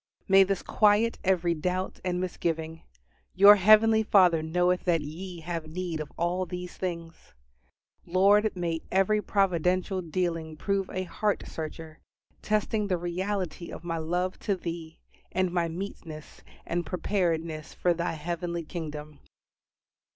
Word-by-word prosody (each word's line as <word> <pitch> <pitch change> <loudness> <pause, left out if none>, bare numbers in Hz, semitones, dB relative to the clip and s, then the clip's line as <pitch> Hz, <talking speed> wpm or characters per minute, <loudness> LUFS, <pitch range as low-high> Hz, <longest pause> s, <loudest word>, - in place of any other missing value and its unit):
May 195 0 +7
this 195 -1 +1
quiet 215 +2 +3
every 180 -3 +2
doubt 180 +4 -3
and 180 -1 -1
misgiving, 165 -3 -3 0.5
"Your 200 +2 +9
heavenly 215 +3 +6
Father 185 -6 +4
knoweth 180 +3 +1
that 170 -3 +2
ye 170 +4 -7
have 165 -1 -4
need 170 0 -4
of 150 -2 -6
all 180 +2 -1
these 180 +1 -6
things." 170 - -6 0.7
Lord, 200 +4 +4
may 170 -2 -2
every 195 +3 +2
providential 185 -1 +1
dealing 165 -2 -3
prove 195 +2 -1
a 185 - -3
heart 205 +2 -1
searcher, 160 0 -7 0.4
testing 215 0 0
the 185 -2 +1
reality 175 0 -3
of - - -9
my 165 -1 -3
love 180 +3 -2
to 200 - 0
Thee, 165 -2 -6 0.4
and 185 0 +1
my 170 -1 +1
meetness 165 -3 -8 0.2
and 175 +1 -1
preparedness 165 -3 -2
for 175 - +2
Thy 170 0 -2
heavenly 170 +2 -4
kingdom. 150 -3 -7
175 Hz, 135 wpm, -28 LUFS, 165-190 Hz, 0.7 s, Your